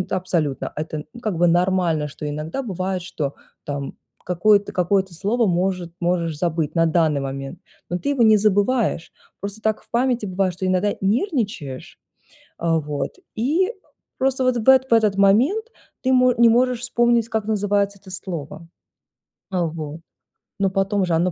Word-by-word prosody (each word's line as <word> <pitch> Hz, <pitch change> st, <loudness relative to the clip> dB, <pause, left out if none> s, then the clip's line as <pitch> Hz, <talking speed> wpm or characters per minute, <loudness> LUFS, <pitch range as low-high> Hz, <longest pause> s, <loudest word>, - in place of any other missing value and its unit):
это 185 Hz, -, -3 dB
абсолютно, 165 Hz, -7 st, -1 dB
это 155 Hz, 0 st, -4 dB, 0.2 s
как 200 Hz, -7 st, -2 dB
бы 175 Hz, -, +4 dB
нормально 175 Hz, -3 st, +2 dB
что 150 Hz, +1 st, -6 dB
иногда 155 Hz, -, -4 dB
бывает 185 Hz, -4 st, -3 dB
что 145 Hz, -5 st, -4 dB, 0.3 s
там 140 Hz, -1 st, -5 dB, 0.3 s
какое-то 200 Hz, +3 st, +3 dB
какое-то 190 Hz, +1 st, +1 dB
слово 215 Hz, +6 st, +1 dB
может 180 Hz, -1 st, 0 dB
можешь 170 Hz, -3 st, 0 dB
забыть 165 Hz, -3 st, -1 dB
на 165 Hz, -, +4 dB
данный 160 Hz, -3 st, +2 dB
момент, 135 Hz, +5 st, -6 dB, 0.3 s
но 175 Hz, -, -1 dB
ты 285 Hz, -, -2 dB
его 265 Hz, -4 st, +2 dB
не 220 Hz, -1 st, +7 dB
забываешь. 205 Hz, -2 st, +1 dB, 0.3 s
Просто 200 Hz, +2 st, -6 dB
так 220 Hz, -1 st, 0 dB
в -, -, -31 dB
памяти 245 Hz, -2 st, +1 dB
бывает, 185 Hz, 0 st, 0 dB
что 185 Hz, +1 st, -3 dB
иногда 185 Hz, +2 st, +1 dB
нервничаешь, 210 Hz, -, -2 dB, 0.6 s
а, 165 Hz, -1 st, +1 dB
вот, 145 Hz, -2 st, -4 dB, 0.2 s
и 320 Hz, -, +1 dB, 0.5 s
просто 265 Hz, 0 st, +1 dB
вот 255 Hz, -1 st, +2 dB
в 235 Hz, +3 st, +2 dB
эт 265 Hz, 0 st, +5 dB
в -, -, +6 dB
этот 215 Hz, -3 st, +3 dB
момент 255 Hz, -, +3 dB, 0.3 s
ты 260 Hz, 0 st, +2 dB
мо 255 Hz, -1 st, +5 dB
не 235 Hz, 0 st, +6 dB
можешь 250 Hz, +1 st, +2 dB
вспомнить, 240 Hz, -2 st, +2 dB
как 220 Hz, -1 st, -1 dB
называется 205 Hz, -1 st, 0 dB
это 190 Hz, -, -15 dB
слово. 170 Hz, -3 st, -6 dB, 0.8 s
А, 180 Hz, -2 st, +1 dB
вот. 155 Hz, 0 st, -6 dB, 0.6 s
Но 195 Hz, -1 st, +2 dB
потом 195 Hz, +1 st, +1 dB
же 170 Hz, -, -1 dB
оно 175 Hz, +2 st, +2 dB
190 Hz, 165 wpm, -22 LUFS, 165-225 Hz, 0.8 s, не